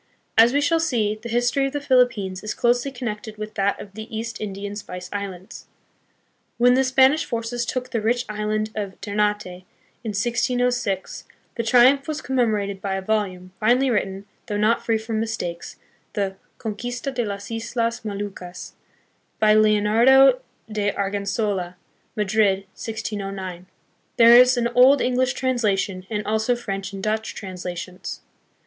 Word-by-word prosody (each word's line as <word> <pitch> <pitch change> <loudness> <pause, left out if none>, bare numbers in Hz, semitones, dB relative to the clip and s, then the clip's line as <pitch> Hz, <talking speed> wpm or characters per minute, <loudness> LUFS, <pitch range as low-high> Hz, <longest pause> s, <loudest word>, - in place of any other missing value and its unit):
As 230 +2 +7
we 285 +2 +2
shall 325 +3 +2
see, 220 -9 0
the 235 - -7
history 245 +4 +1
of 270 - -7
the 290 - -1
Philippines 240 -9 +2
is 215 - -4
closely 245 +3 +2
connected 220 -4 -6
with 215 0 -6
that 200 -1 0
of 195 - -10
the 220 +1 -8
East 230 0 -5
Indian 200 0 -5
Spice 180 -3 -7
Islands. 195 -2 -7 0.9
When 245 +1 +5
the 265 +1 +3
Spanish 265 +4 +4
forces 235 0 -3
took 255 0 -3
the 230 - -1
rich 240 +3 +1
island 215 0 -2
of 200 -3 -5
Ternate 210 0 0
in 180 0 -9 0.5
1606, 240 -2 -1 0.3
the - - -2
triumph 255 +4 +5
was 310 -1 -4
commemorated 215 -6 0
by 195 -1 -2
a 190 - -2
volume, 190 -3 -2
finely 250 +4 +3
written, 195 -3 -2 0.2
though 205 - -2
not 215 +3 +2
free 225 -1 +1
from 220 0 -3
mistakes, 220 -7 -4 0.4
the 195 -2 -2 0.2
Con 220 -3 -4
quista 245 +5 -5
de 245 -1 -1
las 200 0 -5
Islas 230 0 -2
Moluccas, 200 -4 -6 0.6
by 215 0 +4
Leonardo 225 +5 +5 0.3
de 210 -2 -1
Argensola, 200 -2 -2 0.4
Madrid, 210 -2 +2
1609. 195 -5 -5 0.5
There 235 0 +8
is 250 +1 +7
an 235 -1 +2
old 255 +3 +6
English 250 0 +1
translation, 205 -8 -1
and 210 -2 -3
also 220 +3 +1
French 195 -5 -5
and 195 -1 -7
Dutch 220 +1 -2
translations. 180 -1 -6
215 Hz, 150 wpm, -23 LUFS, 200-245 Hz, 0.9 s, There